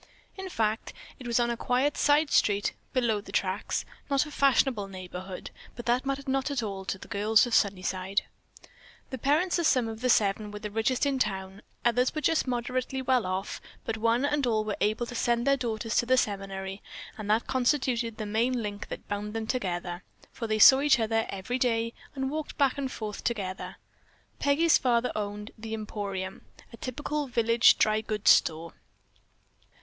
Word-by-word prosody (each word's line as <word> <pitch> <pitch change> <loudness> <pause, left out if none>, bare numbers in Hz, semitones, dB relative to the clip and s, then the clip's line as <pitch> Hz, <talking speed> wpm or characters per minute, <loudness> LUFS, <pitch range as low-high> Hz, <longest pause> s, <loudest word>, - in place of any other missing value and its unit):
In 380 -1 -6
fact, 220 -7 -1 0.3
it 250 - -8
was 235 0 +2
on 240 0 +1
a - - -1
quiet 255 +5 +1
side 295 0 +3
street 205 -1 +2 0.2
"below 235 -5 +1
the - - -12
tracks," 190 +2 -1 0.2
not 275 +1 +2
a 300 - -9
fashionable 265 -7 +2
neighborhood, 185 0 -8 0.2
but 240 - -8
that 245 +3 +1
mattered 275 0 -2
not 270 +1 0
at 275 -5 -1
all 195 -2 -5
to 190 - -2
the - - -12
girls 210 +3 +3
of 240 - -5
Sunnyside. 190 -1 +1 0.9
The 260 - -5
parents 315 +8 +2
of 335 - +3
some 250 -3 +3
of 225 0 -7
the 250 - +1
seven 210 -1 +2
were 210 - -7
the 210 0 -6
richest 230 +5 +1
in 275 -2 0
town, 195 -3 -2 0.2
others 250 +3 +2
were 310 - -1
just 320 -2 +2
moderately 255 +2 -2
well 255 -5 +2
off, 185 +1 -3 0.2
but 225 - -2
one 230 +4 +2
and 290 -2 +1
all 220 -2 +1
were 210 -2 -2
able 215 +3 +1
to 240 - -8
send 235 0 +1
their 275 0 +4
daughters 225 -3 -3
to 240 - +2
the 255 +1 +4
seminary, 195 -2 -2 0.3
and 210 -2 -7
that 220 +2 +2
constituted 245 -3 0
the 215 - -4
main 230 +3 0
link 205 -1 -5
that - - -8
bound 205 +1 -4
them 225 -1 -2
together, 180 -6 -3 0.3
for 230 - -5
they 215 0 0
saw 265 +5 +9
each 285 -3 +4
other 225 0 0
every 200 +7 -3
day 230 -2 +1 0.2
and 265 0 -2
walked 310 0 -5
back 275 -2 +3
and 265 -2 -2
forth 210 -2 -6
together. 195 -5 -3 0.6
Peggy's 305 +3 +4
father 245 -1 +1
owned 210 0 -4
"The 220 0 -4
Emporium," 200 -3 -5 0.3
a - - -9
typical 290 +4 -3
village 230 -1 +4
dry 215 0 +2
goods 215 -1 +3
store. 165 +1 +2
230 Hz, 185 wpm, -28 LUFS, 205-255 Hz, 0.9 s, saw